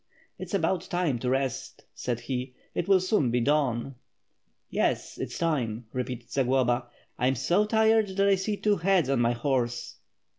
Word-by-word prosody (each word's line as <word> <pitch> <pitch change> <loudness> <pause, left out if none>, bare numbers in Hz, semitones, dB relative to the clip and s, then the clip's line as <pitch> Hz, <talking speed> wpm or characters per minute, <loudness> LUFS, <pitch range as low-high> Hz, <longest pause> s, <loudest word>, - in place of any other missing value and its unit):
"It's - - -4
about 180 -1 +1
time 175 -9 0
to 125 - -3
rest/' 135 0 -2
said 120 -1 -3
he, 125 +1 -4 0.2
"it 175 - -2
will 195 -1 +5
soon 185 - +1
be 120 +1 +1
dawn.'^ 135 -1 +1 0.7
"Yes, - - -1
it - - -1
is - - -8
time," 125 -9 -1
repeated 125 -1 -4
Zagloba. 125 -2 +1 0.3
"I 125 - +2
am 130 - +2
so 175 - +2
tired 220 0 +3
that 200 0 +4
I 200 - +5
see 200 +2 -1
two 210 -1 +2
heads 180 -4 +2
on 135 - +2
my 120 0 +3
horse." 120 -1 -2
135 Hz, 175 wpm, -27 LUFS, 125-185 Hz, 0.7 s, will